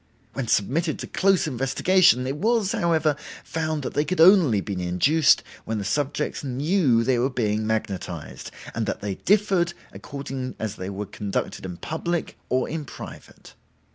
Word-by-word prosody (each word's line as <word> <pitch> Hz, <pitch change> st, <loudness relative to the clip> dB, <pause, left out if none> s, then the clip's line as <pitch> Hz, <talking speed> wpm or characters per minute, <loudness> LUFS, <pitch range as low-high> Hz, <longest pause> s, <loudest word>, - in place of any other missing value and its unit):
When 135 Hz, -3 st, -3 dB
submitted 150 Hz, -, +1 dB
to -, -, -5 dB
close 195 Hz, -1 st, +2 dB
investigation, 135 Hz, +2 st, +3 dB
it 135 Hz, +2 st, -3 dB
was, 220 Hz, +2 st, +1 dB
however, 160 Hz, -3 st, +2 dB, 0.3 s
found 155 Hz, -2 st, -2 dB
that -, -, -4 dB
they 145 Hz, -, +2 dB
could 170 Hz, +4 st, -3 dB
only 165 Hz, -, +6 dB
be 100 Hz, +1 st, -4 dB
induced 90 Hz, -, +3 dB, 0.2 s
when 110 Hz, -, -3 dB
the 105 Hz, -, -3 dB
subjects 145 Hz, +9 st, -1 dB
knew 135 Hz, -2 st, +2 dB
they 125 Hz, 0 st, +2 dB
were 130 Hz, +3 st, +2 dB
being 110 Hz, -4 st, -1 dB
magnetized, 100 Hz, -7 st, -4 dB, 0.2 s
and -, -, -2 dB
that -, -, -3 dB
they 105 Hz, -1 st, -2 dB
differed 190 Hz, -, +2 dB, 0.2 s
according 135 Hz, -2 st, -6 dB
as 110 Hz, -1 st, -4 dB
they 95 Hz, +1 st, -5 dB
were 100 Hz, +1 st, -4 dB
conducted 100 Hz, -1 st, -4 dB
in 90 Hz, -1 st, -7 dB
public 170 Hz, -, -3 dB
or 130 Hz, 0 st, +1 dB
in 160 Hz, 0 st, -4 dB
private. -, -, -11 dB
135 Hz, 160 wpm, -24 LUFS, 110-165 Hz, 0.3 s, only